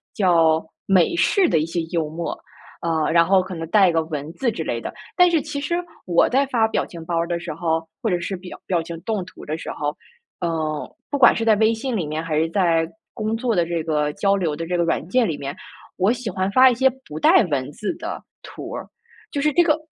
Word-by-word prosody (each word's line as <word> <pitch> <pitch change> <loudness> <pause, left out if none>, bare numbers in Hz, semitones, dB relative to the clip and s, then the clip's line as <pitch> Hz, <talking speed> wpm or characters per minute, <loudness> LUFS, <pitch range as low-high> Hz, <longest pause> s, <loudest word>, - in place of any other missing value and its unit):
叫 165 -5 +3 0.2
美 190 - +4
式 370 +2 +3
的 160 - +2
一 155 - 0
些 165 +1 -3
幽 165 -3 0
默， 165 +2 -4 0.5
呃， 160 -2 0
然 170 0 +5
后 195 0 +5
可 185 - -7
能 165 -1 -5
带 195 -2 +5
个 165 -1 +2
文 150 -1 -5
字 245 +3 0
之 225 - -4
类 - - -2
的。 - - -5 0.2
但 360 -1 +6
是 330 -3 +2
其 295 -1 -5
实 315 +4 -1 0.3
我 170 -1 +4
在 270 +2 +3
发 230 -4 +2
表 - - 0
情 165 -2 -10
包 170 -1 -1
儿 170 - 0
的 170 0 -2
时 170 -1 -5
候， 165 0 -1 0.2
或 230 - 0
者 180 -2 +1
是 190 +2 -3
表 180 0 -10
表 175 -3 +1
情 165 0 -7
动 210 0 -2
图 - - -12
的 155 +1 -3
时 - - -7
候， 150 0 -3 0.4
呃， 160 -3 -3
不 285 - -1
管 245 - +7
是 225 - -1
在 225 - +5
微 220 +1 +4
信 240 +2 -3
里 170 - -1
面 155 +2 -3
还 155 -2 -1
是 160 +1 +1
在 165 -3 +2 0.2
工 215 +1 -2
作 235 0 0
的 175 - +2
这 170 -1 -2
个 150 -2 0
交 200 +4 +2
流 160 -5 -1
的 165 - -4
这 175 +1 -1
个 170 - +2
软 165 -1 0
件 250 +2 +3
里 160 - -2
面， 140 0 -5 0.4
我 195 +5 +3
喜 250 -2 -5
欢 190 0 -1
发 260 +3 +8
一 245 - +1
些 265 +2 +4 0.2
不 150 +1 -7
带 - - +6
文 130 -2 -1
字 210 - -3
的 - - -6 0.2
图 - - -9
儿， - - -6 0.4
就 285 - -2
是 300 +1 +2
这 345 - +5
个 310 -3 +3
175 Hz, 265 characters per minute, -22 LUFS, 160-225 Hz, 0.5 s, 发